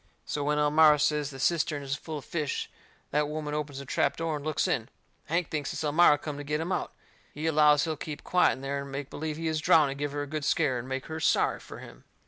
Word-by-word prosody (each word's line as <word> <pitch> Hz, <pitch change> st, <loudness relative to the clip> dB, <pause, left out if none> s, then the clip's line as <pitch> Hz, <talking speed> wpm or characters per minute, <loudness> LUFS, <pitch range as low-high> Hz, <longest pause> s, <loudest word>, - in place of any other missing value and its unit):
So 145 Hz, -, -3 dB
when 150 Hz, +1 st, +1 dB
Elmira 150 Hz, +1 st, +5 dB
says 150 Hz, 0 st, +1 dB
the 135 Hz, -, -9 dB
cistern 150 Hz, 0 st, 0 dB
is 135 Hz, -1 st, -3 dB
full 155 Hz, +2 st, -5 dB
of 145 Hz, -, -9 dB
fish, 150 Hz, -5 st, -3 dB, 0.4 s
that 150 Hz, 0 st, +1 dB
woman 150 Hz, -1 st, -4 dB
opens 150 Hz, -2 st, -3 dB
the 140 Hz, -, -6 dB
trap -, -, 0 dB
door 165 Hz, -2 st, -1 dB
and 145 Hz, -, -9 dB
looks 155 Hz, 0 st, 0 dB
in. 115 Hz, +2 st, -1 dB, 0.4 s
Hank 170 Hz, +2 st, -1 dB
thinks 150 Hz, -3 st, -2 dB
it's -, -, -4 dB
Elmira 150 Hz, 0 st, +5 dB
come 145 Hz, -1 st, -6 dB
to 145 Hz, -, -6 dB
get 150 Hz, +1 st, -1 dB
him 165 Hz, +3 st, -3 dB
out. -, -, -1 dB, 0.4 s
He 150 Hz, +2 st, -4 dB
allows 150 Hz, -2 st, +5 dB
he'll 160 Hz, -1 st, -1 dB
keep 150 Hz, 0 st, -7 dB
quiet 180 Hz, -, +3 dB
in 130 Hz, -, -9 dB
there 140 Hz, +1 st, -2 dB
and 140 Hz, 0 st, -8 dB
make 135 Hz, 0 st, -5 dB
believe 155 Hz, 0 st, -4 dB
he 165 Hz, 0 st, -3 dB
is 155 Hz, -1 st, -1 dB
drowned 150 Hz, -3 st, +5 dB
and 140 Hz, -, -7 dB
give 145 Hz, -1 st, -2 dB
her 145 Hz, 0 st, -2 dB
a -, -, -4 dB
good 155 Hz, +1 st, -4 dB
scare 140 Hz, -4 st, +1 dB
and 125 Hz, +2 st, -8 dB
make 135 Hz, 0 st, -3 dB
her 160 Hz, 0 st, -5 dB
sorry 150 Hz, -, +2 dB
fur -, -, -11 dB
him. -, -, -12 dB
150 Hz, 260 wpm, -28 LUFS, 140-155 Hz, 0.4 s, Elmira